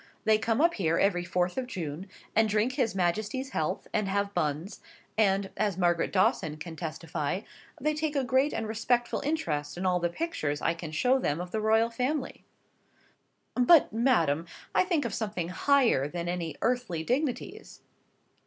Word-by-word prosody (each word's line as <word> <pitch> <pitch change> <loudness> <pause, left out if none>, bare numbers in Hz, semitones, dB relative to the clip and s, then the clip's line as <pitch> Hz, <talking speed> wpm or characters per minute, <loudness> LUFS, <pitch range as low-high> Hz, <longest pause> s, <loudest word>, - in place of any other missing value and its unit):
They 215 -1 +4
come 225 +2 0
up 340 +1 +4
here 165 -4 +1
every 180 -3 +2
fourth 180 +4 0
of 255 - -4
June, 175 - -5 0.3
and 220 0 +4
drink 215 +4 +1
his 225 -5 0
Majesty's 210 +9 -1
health, 160 +1 -2
and 210 -2 +1
have 200 +1 -1
buns, 155 +5 -2 0.3
and 195 -2 +2
(as 205 -4 0
Margaret 175 -2 +1
Dawson 170 -5 +1
can 160 +2 -7
testify) 160 +1 -3 0.4
they 305 +2 +1
take 305 0 -2
a 275 - +2
great 260 +4 +2
and 225 - -3
respectful 240 +2 0
interest 155 - -2
in 185 - -3
all 180 -1 +2
the 175 0 0
pictures 170 - -2
I 165 - +1
can 165 -2 -7
show 250 +11 +2
them 150 - -1
of 180 0 -6
the 220 - -1
royal 220 +2 +3
family." 255 +4 -2 1.1
"But, 250 +1 +5
madam, 170 - +2 0.3
I - - +3
think 340 -6 0
of - - -3
something 205 -6 -3
higher 240 - +3
than 170 +2 -4
any 175 -2 -3
earthly 235 -10 0
dignities." 255 - -3
200 Hz, 170 wpm, -29 LUFS, 170-250 Hz, 1.1 s, But